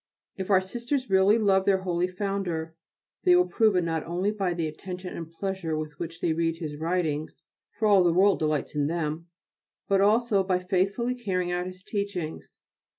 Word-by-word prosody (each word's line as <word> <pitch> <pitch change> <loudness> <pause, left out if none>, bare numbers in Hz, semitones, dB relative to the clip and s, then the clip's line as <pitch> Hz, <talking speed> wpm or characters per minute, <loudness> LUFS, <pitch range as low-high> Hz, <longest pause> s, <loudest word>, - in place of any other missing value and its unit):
If 190 0 -5
our 190 -2 +5
Sisters 240 +5 -3
really 190 +3 +5
love 195 -3 +3
their 190 -1 +2
holy 180 -1 0
Founder 180 -4 -3 0.5
they 180 - +6
will 180 0 +5
prove 210 +3 +2
it 180 - +3
not 165 -2 -1
only 180 +5 -1
by 195 -4 -1
the 170 -2 -1
attention 180 +4 -6
and 165 -1 -7
pleasure 180 -3 -3
with 155 -1 -6
which 165 0 -6
they 165 - +1
read 165 0 0
his 155 -3 -5
writings, 160 -2 -1 0.4
for 215 - +2
all 200 -3 +6
the 175 - +4
world 195 +3 +4
delights 155 -2 -1
in 145 -1 0
them, 165 0 -3 0.6
but 195 -1 +3
also 210 -1 +3
by 185 -1 +1
faithfully 195 +6 0
carrying 185 -7 -2
out 180 0 -1
his 185 0 -10
teachings. 200 -7 -4
180 Hz, 185 wpm, -27 LUFS, 165-195 Hz, 0.6 s, they